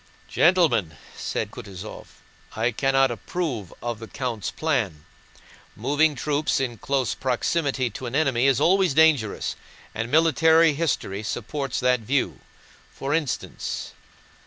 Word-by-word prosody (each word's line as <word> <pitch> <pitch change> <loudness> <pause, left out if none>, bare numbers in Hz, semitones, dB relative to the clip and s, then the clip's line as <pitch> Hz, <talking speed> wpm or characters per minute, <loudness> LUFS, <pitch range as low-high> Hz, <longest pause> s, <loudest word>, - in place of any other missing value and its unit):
"Gentlemen," 160 - +3 0.2
said - - -3
Kutúzov, 100 +2 -9 0.5
"I 115 +3 +1
cannot 135 +2 +2
approve 120 - -4
of 120 -2 -3
the 115 - -8
count's 115 -9 -3
plan. 110 - -1 0.7
Moving 145 +6 +2
troops 145 +3 0
in 120 -5 -3
close 135 0 0
proximity 130 0 0
to 125 +4 -6
an 120 - -4
enemy 135 -4 +2
is 135 -2 +3
always 180 -1 +3
dangerous, 150 -9 +3 0.4
and 110 +2 -3
military 160 +2 +5
history 140 -10 -1
supports 130 +5 -3
that 125 0 +3
view. 130 +5 -1 0.5
For 140 +2 -3
instance..." 150 -5 -3
135 Hz, 120 wpm, -24 LUFS, 115-155 Hz, 0.7 s, military